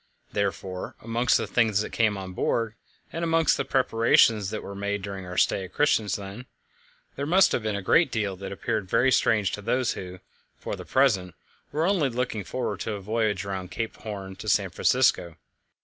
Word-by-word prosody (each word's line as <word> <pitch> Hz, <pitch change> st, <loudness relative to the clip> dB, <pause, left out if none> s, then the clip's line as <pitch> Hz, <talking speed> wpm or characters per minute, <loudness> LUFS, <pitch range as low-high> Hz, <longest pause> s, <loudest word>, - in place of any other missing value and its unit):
Therefore, 95 Hz, -2 st, -3 dB
amongst 115 Hz, +2 st, +2 dB
the -, -, -2 dB
things 110 Hz, -4 st, +2 dB
that -, -, -5 dB
came 110 Hz, -3 st, +1 dB
on 95 Hz, -1 st, -7 dB
board, 115 Hz, +4 st, 0 dB, 0.4 s
and 165 Hz, -, -3 dB
amongst 165 Hz, -1 st, +3 dB
the -, -, -1 dB
preparations 115 Hz, -5 st, +3 dB
that 110 Hz, -, -5 dB
were 100 Hz, -, -7 dB
made 100 Hz, 0 st, -3 dB
during 95 Hz, -2 st, -6 dB
our 90 Hz, -, -7 dB
stay 95 Hz, -, +2 dB
at 95 Hz, -, -11 dB
Christiansand, 105 Hz, -4 st, 0 dB, 0.7 s
there 140 Hz, +1 st, -3 dB
must 185 Hz, +4 st, +5 dB
have -, -, 0 dB
been 105 Hz, -1 st, -2 dB
a 100 Hz, -, -4 dB
great 165 Hz, -, +4 dB
deal 105 Hz, -4 st, -1 dB
that 100 Hz, -, -7 dB
appeared 100 Hz, 0 st, -3 dB
very 125 Hz, +5 st, +3 dB
strange 105 Hz, -5 st, +3 dB
to 105 Hz, -, -5 dB
those 125 Hz, +4 st, 0 dB
who, 90 Hz, 0 st, -7 dB, 0.4 s
for -, -, -5 dB
the -, -, -9 dB
present, 100 Hz, -, +2 dB, 0.4 s
were 155 Hz, +3 st, 0 dB
only 175 Hz, -7 st, +2 dB
looking 120 Hz, -3 st, -2 dB
forward 105 Hz, +1 st, -3 dB
to 110 Hz, -, -3 dB
a 100 Hz, -, -4 dB
voyage 105 Hz, -1 st, -1 dB
round 95 Hz, -2 st, -4 dB
Cape 115 Hz, +4 st, -4 dB
Horn 100 Hz, -3 st, -7 dB
to -, -, -5 dB
San -, -, +2 dB
Francisco. 85 Hz, -2 st, +2 dB
105 Hz, 190 wpm, -26 LUFS, 95-125 Hz, 0.7 s, must